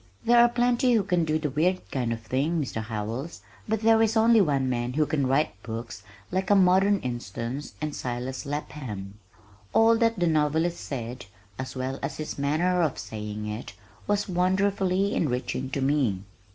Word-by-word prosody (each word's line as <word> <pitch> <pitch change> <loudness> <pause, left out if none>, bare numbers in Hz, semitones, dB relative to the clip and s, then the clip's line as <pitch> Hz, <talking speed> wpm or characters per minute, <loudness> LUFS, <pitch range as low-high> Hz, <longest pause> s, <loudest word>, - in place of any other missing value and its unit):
"There 240 +1 +6
are 240 - +6
plenty 245 +1 +2
who 220 -3 +3
can 180 -4 +1
do 155 0 +1
the 150 -3 -2
weird 175 +6 0
kind 125 -4 -1
of 115 -1 -3
thing, 140 +9 0
Mr. 130 -6 -3
Howells, 110 +7 -5 0.3
but 220 0 0
there 225 0 +5
is 225 0 +2
only 225 0 +6
one 140 -7 +1
man 120 0 -1
who 155 +2 +2
can 145 -2 0
write 135 -7 0
books 115 -2 -6 0.3
like 190 0 -1
A 205 - +6
Modern 195 +2 +5
Instance 120 +3 -5
and 150 -1 -3
Silas 125 +1 -4
Lapham." 120 -9 -6 0.5
All 225 +1 +5
that 230 -1 +2
the 175 - +1
novelist 160 +2 +1
said, 120 -3 -6 0.3
as 130 +1 -5
well 130 +1 -3
as 140 - -4
his 155 -2 -5
manner 170 +6 +1
of 155 -5 0
saying 105 -1 -6
it 105 +2 -6 0.3
was 205 0 +1
wonderfully 190 +1 +1
enriching 130 -2 -1
to 140 +1 -2
me. 130 -9 +1
150 Hz, 175 wpm, -26 LUFS, 125-190 Hz, 0.5 s, There